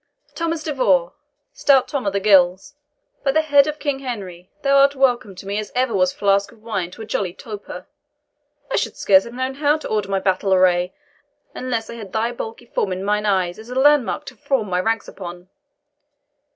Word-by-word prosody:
"Thomas 330 Hz, -1 st, -2 dB
de 305 Hz, -, -2 dB
Vaux! 185 Hz, -10 st, +2 dB, 0.4 s
stout 270 Hz, -3 st, +3 dB
Tom 270 Hz, -7 st, -3 dB
of 195 Hz, -, 0 dB
the 200 Hz, -, +1 dB
Gills! 190 Hz, +3 st, +3 dB, 0.5 s
by 275 Hz, -, +2 dB
the 315 Hz, +3 st, +2 dB
head 285 Hz, -2 st, +5 dB
of 300 Hz, 0 st, -3 dB
King 285 Hz, -3 st, -2 dB
Henry, 190 Hz, -9 st, -7 dB
thou 275 Hz, 0 st, +4 dB
art 280 Hz, +1 st, +5 dB
welcome 245 Hz, -7 st, +1 dB
to 185 Hz, -, -11 dB
me 200 Hz, +2 st, -2 dB
as 215 Hz, -, -6 dB
ever 250 Hz, -2 st, +1 dB
was 185 Hz, -2 st, +2 dB
flask 200 Hz, 0 st, +1 dB
of 220 Hz, -2 st, -21 dB
wine 200 Hz, -6 st, -3 dB
to 205 Hz, +5 st, -10 dB
a -, -, -8 dB
jolly 190 Hz, -4 st, -2 dB
toper! 210 Hz, -1 st, -8 dB, 0.9 s
I -, -, +1 dB
should -, -, -2 dB
scarce 190 Hz, -1 st, +4 dB
have 235 Hz, -, -9 dB
known 260 Hz, +1 st, -2 dB
how 290 Hz, +2 st, +2 dB
to 310 Hz, -, -7 dB
order 210 Hz, -2 st, -1 dB
my 195 Hz, -1 st, +1 dB
battle 190 Hz, 0 st, +1 dB
array, 180 Hz, 0 st, +2 dB, 0.6 s
unless 240 Hz, -3 st, -3 dB
I -, -, -8 dB
had 205 Hz, -5 st, -9 dB
thy 225 Hz, +2 st, 0 dB
bulky 235 Hz, 0 st, -7 dB
form 200 Hz, -, -2 dB
in 185 Hz, +1 st, -3 dB
mine 210 Hz, +1 st, 0 dB
eye 190 Hz, -3 st, +2 dB
as 220 Hz, +6 st, -11 dB
a 250 Hz, -, -6 dB
landmark 290 Hz, -1 st, +3 dB
to -, -, -10 dB
form 270 Hz, -8 st, -1 dB
my 180 Hz, -, +1 dB
ranks 225 Hz, +3 st, -1 dB
upon. 175 Hz, -1 st, -9 dB
215 Hz, 205 wpm, -21 LUFS, 190-270 Hz, 0.9 s, head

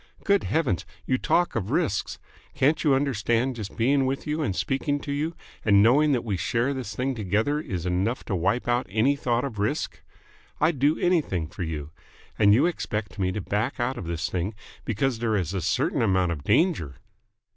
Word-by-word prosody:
Good 200 Hz, 0 st, +2 dB
Heavens, 140 Hz, -, 0 dB, 0.2 s
you 130 Hz, -, +1 dB
talk 175 Hz, 0 st, +1 dB
of 105 Hz, -4 st, -2 dB
risks. -, -, 0 dB, 0.4 s
Can't 140 Hz, +3 st, +2 dB
you 145 Hz, -4 st, +4 dB
understand 125 Hz, -2 st, +1 dB
that 125 Hz, -, -9 dB
just 105 Hz, -3 st, -7 dB
being 135 Hz, +3 st, +3 dB
with 135 Hz, +1 st, -2 dB
you 150 Hz, +1 st, -1 dB
and 100 Hz, -11 st, -1 dB
speaking 135 Hz, -, -1 dB
to 145 Hz, -, -5 dB
you 155 Hz, +4 st, -2 dB, 0.3 s
and 100 Hz, -2 st, +5 dB
knowing 145 Hz, +7 st, +5 dB
that 125 Hz, -, 0 dB
we 105 Hz, -5 st, -2 dB
share 120 Hz, +9 st, 0 dB
this 130 Hz, -6 st, -5 dB
thing 135 Hz, +1 st, -1 dB
together 110 Hz, +7 st, 0 dB
is 95 Hz, -, -4 dB
enough 95 Hz, +7 st, 0 dB
to 100 Hz, -, -2 dB
wipe 95 Hz, +9 st, 0 dB
out 120 Hz, +1 st, +1 dB
any 110 Hz, +8 st, +2 dB
thought 125 Hz, -3 st, 0 dB
of 115 Hz, -7 st, -6 dB
risk? 105 Hz, +1 st, -2 dB, 0.6 s
I'd 155 Hz, -2 st, +2 dB
do 145 Hz, +4 st, +3 dB
anything 155 Hz, -, +1 dB
for 85 Hz, -, -10 dB
you. 80 Hz, -3 st, -4 dB, 0.5 s
And 100 Hz, -1 st, +6 dB
you 115 Hz, +9 st, +5 dB
expect 105 Hz, -, -3 dB
me 95 Hz, -1 st, +1 dB
to 105 Hz, -, -3 dB
back 105 Hz, +9 st, -2 dB
out 120 Hz, +2 st, -1 dB
of 95 Hz, -, -6 dB
this 85 Hz, -1 st, -2 dB
thing 95 Hz, +4 st, -3 dB, 0.3 s
because 115 Hz, +2 st, 0 dB
there 115 Hz, -2 st, 0 dB
is 90 Hz, -3 st, -1 dB
a 95 Hz, -, -1 dB
certain -, -, 0 dB
amount 95 Hz, -5 st, +2 dB
of 75 Hz, -5 st, -5 dB
danger!" 105 Hz, -, +2 dB
115 Hz, 200 wpm, -26 LUFS, 95-140 Hz, 0.6 s, And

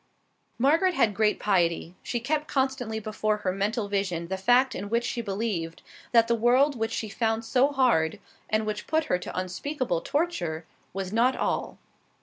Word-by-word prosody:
Margaret 325 Hz, +8 st, +3 dB
had 215 Hz, -8 st, +3 dB
great 210 Hz, +1 st, +1 dB
piety. 175 Hz, -4 st, +1 dB
She 240 Hz, -, -3 dB
kept 300 Hz, +5 st, -1 dB
constantly 265 Hz, -5 st, -1 dB
before 215 Hz, 0 st, -1 dB
her 195 Hz, -3 st, -1 dB
mental 205 Hz, +3 st, -1 dB
vision 185 Hz, -4 st, -2 dB
the 190 Hz, -, -1 dB
fact 245 Hz, +7 st, +3 dB
in 200 Hz, +2 st, -5 dB
which 235 Hz, +2 st, +1 dB
she 240 Hz, -, -2 dB
believed, 195 Hz, -6 st, -3 dB, 0.3 s
that 230 Hz, -1 st, +5 dB
the 235 Hz, -, +2 dB
world 250 Hz, +5 st, +3 dB
which 225 Hz, -1 st, -1 dB
she 220 Hz, -, -3 dB
found 225 Hz, +1 st, -1 dB
so 255 Hz, +4 st, +3 dB
hard, 245 Hz, -, +2 dB, 0.3 s
and 215 Hz, 0 st, +1 dB
which 215 Hz, -1 st, -4 dB
put 315 Hz, +1 st, +2 dB
her 180 Hz, -, 0 dB
to 180 Hz, -, -7 dB
unspeakable 185 Hz, -, -2 dB
torture, 175 Hz, -, -2 dB, 0.3 s
was 190 Hz, +1 st, -5 dB
not 245 Hz, +4 st, +3 dB
all. -, -, -2 dB
220 Hz, 170 wpm, -27 LUFS, 195-255 Hz, 0.3 s, that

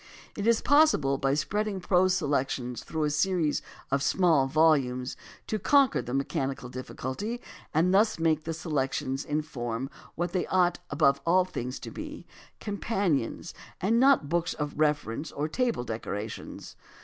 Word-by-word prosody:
It 205 Hz, +1 st, -2 dB
is 230 Hz, -1 st, +3 dB
possible 265 Hz, -, +4 dB
by 135 Hz, 0 st, +1 dB
spreading 205 Hz, +5 st, -1 dB
prose 185 Hz, 0 st, +3 dB
selections 135 Hz, -6 st, -1 dB
through 160 Hz, -1 st, -3 dB
a 150 Hz, -, +1 dB
series 160 Hz, 0 st, +1 dB, 0.3 s
of 140 Hz, 0 st, +2 dB
small 160 Hz, -3 st, +3 dB
volumes 135 Hz, -4 st, +2 dB, 0.3 s
to 215 Hz, -, -2 dB
conquer 275 Hz, +5 st, +4 dB
the 125 Hz, -, -4 dB
mechanical 135 Hz, -2 st, -2 dB
difficulty 130 Hz, -, -5 dB, 0.3 s
and 170 Hz, +4 st, +2 dB
thus 210 Hz, +3 st, +4 dB
make 160 Hz, -2 st, +1 dB
the 165 Hz, -, -3 dB
selections 135 Hz, -4 st, -2 dB
in 150 Hz, +1 st, -1 dB
form 120 Hz, -3 st, -4 dB, 0.2 s
what 175 Hz, +2 st, -2 dB
they 185 Hz, -, -1 dB
ought 180 Hz, -1 st, +2 dB
above 140 Hz, -1 st, +3 dB
all 180 Hz, +2 st, +4 dB
things 125 Hz, -7 st, -5 dB
to -, -, -7 dB
be -, -, -8 dB, 0.2 s
— -, -, -27 dB
companions 195 Hz, -, -1 dB, 0.3 s
and 220 Hz, +6 st, +2 dB
not 265 Hz, -, +5 dB
books 170 Hz, +2 st, 0 dB
of 150 Hz, -1 st, -3 dB
reference 150 Hz, -2 st, 0 dB
or 145 Hz, +2 st, -2 dB
table 235 Hz, -, 0 dB
decorations. 110 Hz, -2 st, -6 dB
155 Hz, 150 wpm, -28 LUFS, 135-185 Hz, 0.3 s, not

